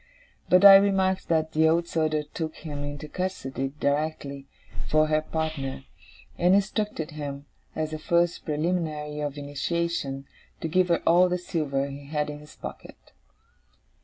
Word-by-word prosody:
But 180 +2 +6
I 195 -1 +12
remarked 190 -1 +2
that 160 -1 +1
the 160 0 +4
Old 170 +1 +2
Soldier 155 -2 0
took 155 +1 -5
him 145 -3 -6
into 145 +1 -6
custody 135 -7 -3
directly, 140 -1 -2 0.4
for 155 0 +4
her 155 0 +2
partner; 155 -4 -3 0.6
and 180 +2 +5
instructed 200 -4 -1
him, 145 -2 -6 0.3
as 155 0 -2
the 155 - -4
first 170 +2 +1
preliminary 150 -2 -2
of 145 -1 -3
initiation, 145 -1 -2 0.3
to - - -3
give 180 +3 +2
her 170 -1 +1
all 180 +2 +5
the 180 - 0
silver 150 -6 -1
he 140 0 -8
had 150 0 -1
in 145 - -8
his 150 0 -14
pocket. - - -10
155 Hz, 150 wpm, -26 LUFS, 145-170 Hz, 0.6 s, I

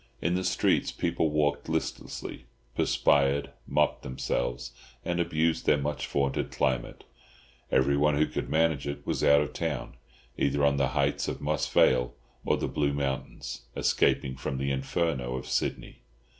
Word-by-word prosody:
In 90 - 0
the 90 +1 0
streets 90 - +2
people 80 - 0
walked 75 0 0
listlessly, 80 -1 -4 0.3
perspired, 70 +1 +2 0.2
mopped 75 -1 +1
themselves, - - -3 0.3
and 85 0 -1
abused 80 -1 0
their 75 - +5
much 75 0 -3
vaunted 70 -1 0
climate. 65 -2 -1 0.7
Everyone 70 +3 +3
who 75 - +4
could - - -4
manage 80 -3 +1
it 70 - -5
was - - -1
out 70 0 +6
of 70 -3 -3
town, - - -3 0.5
either 70 +1 +2
on 70 0 +3
the 70 -1 +2
heights - - +1
of - - -3
Moss 75 -2 -1
Vale 60 -1 +3 0.3
or - - +2
the - - -2
Blue 70 -1 0
Mountains, 65 -3 -4
escaping 65 -1 +2
from 65 0 -4
the 70 +1 -1
Inferno 65 -2 -1
of 65 - -5
Sydney. - - -2
70 Hz, 150 wpm, -28 LUFS, 65-75 Hz, 0.7 s, out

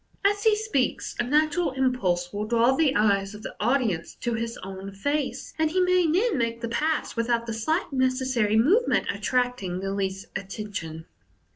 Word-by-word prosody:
As 410 +1 +2
he 440 -1 +5
speaks, 420 - -1
a - - +3
natural 305 +4 +1
impulse 205 -10 0
will 205 +1 -2
draw 235 +3 +3
the 290 -2 +2
eyes 200 -1 +2
of 210 - -11
the - - -7
audience 220 -7 0
to 240 - -1
his 230 0 -3
own 195 +1 -7
face, 285 +7 -2
and 315 -1 +3
he 365 +4 0
may 365 -1 +3
then 385 - +2
make 230 0 -1
the 235 - -3
pass 310 +7 -1
without 230 0 0
the 230 - -4
slight 310 - -1
neces 260 0 +1
sary 215 -3 +2
movement 370 - +3
attracting 245 -8 -1
the 195 +1 -3
least 195 -1 -2
attention. 190 -5 -6
235 Hz, 175 wpm, -26 LUFS, 205-295 Hz, -, he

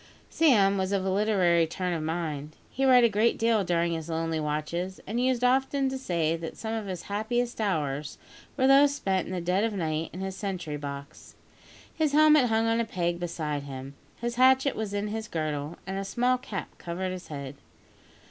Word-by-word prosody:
Sam 205 -11 +4
was 190 0 -1
of 195 -1 0
a 190 - +1
literary 185 -5 +3
turn 180 +2 -2
of 165 - -2
mind. 155 -2 -3 0.2
He 270 - 0
read 250 -2 +7
a - - +7
great 220 +2 +2
deal 225 -2 +2
during 170 -1 +1
his 160 0 -5
lonely 165 0 -1
watches, 155 +5 -3
and 225 +4 -2
used 255 -1 +1
often 265 +2 +2
to 265 - -3
say 165 -9 0
that 165 -1 -7
some 220 0 -4
of 220 -2 -3
his 185 -3 -5
happiest 230 +3 -2
hours 150 -7 -2 0.4
were 260 - +3
those 280 +1 +6
spent 190 -8 -1
in - - -6
the 185 - -2
dead 180 +4 +1
of 225 -1 0
night 160 -4 -2
in 185 - -7
his 190 0 -4
sentry 180 -7 -4
box. 140 -1 -8 0.6
His 310 -3 0
helmet 305 -2 +6
hung 225 -1 +2
on 225 0 +2
a - - +2
peg 175 -4 -2
beside 155 -4 -3
him. 135 -1 -8 0.3
His 235 0 -3
hatchet 260 +2 +4
was 210 -2 -3
in 205 +1 -2
his 220 +1 -4
girdle, 155 -2 -3
and 190 +1 -3
a - - -3
small 245 +5 +1
cap 215 -7 -7
covered 180 +2 -3
his 185 -1 -7
head. 140 -3 -6
190 Hz, 200 wpm, -27 LUFS, 165-230 Hz, 0.6 s, read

